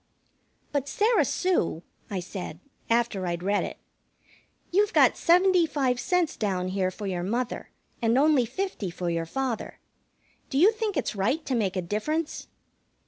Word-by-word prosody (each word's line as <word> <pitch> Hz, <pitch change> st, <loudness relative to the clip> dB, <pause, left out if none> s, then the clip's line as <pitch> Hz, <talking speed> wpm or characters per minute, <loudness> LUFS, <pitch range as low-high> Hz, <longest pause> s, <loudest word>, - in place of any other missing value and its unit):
"But, 285 Hz, -1 st, -1 dB
Sarah 440 Hz, +3 st, +3 dB
Sue," 345 Hz, -, 0 dB, 0.3 s
I 195 Hz, -3 st, -2 dB
said, 180 Hz, -3 st, -7 dB, 0.3 s
after 230 Hz, -5 st, +1 dB
I'd 175 Hz, 0 st, -3 dB
read 205 Hz, +2 st, +1 dB
it, -, -, -6 dB, 0.9 s
"you've 415 Hz, +4 st, +2 dB
got -, -, +5 dB
seventy 360 Hz, 0 st, +4 dB
five 265 Hz, -5 st, 0 dB
cents 360 Hz, +1 st, +1 dB
down 185 Hz, -4 st, -1 dB
here 185 Hz, -1 st, 0 dB
for 205 Hz, +3 st, -7 dB
your 185 Hz, -3 st, -2 dB
mother 235 Hz, +7 st, -2 dB, 0.3 s
and 230 Hz, +1 st, +3 dB
only 280 Hz, -4 st, +4 dB
fifty 260 Hz, -, -3 dB
for 175 Hz, 0 st, -3 dB
your 165 Hz, -1 st, -2 dB
father. 260 Hz, +3 st, -3 dB, 0.7 s
Do 270 Hz, -, -1 dB
you 370 Hz, +9 st, +7 dB
think 435 Hz, -5 st, -2 dB
it's 265 Hz, -, -1 dB
right 250 Hz, +11 st, 0 dB
to 265 Hz, -, -2 dB
make 205 Hz, -6 st, 0 dB
a 185 Hz, -, -1 dB
difference?" 300 Hz, -, -2 dB
240 Hz, 155 wpm, -27 LUFS, -, 0.9 s, you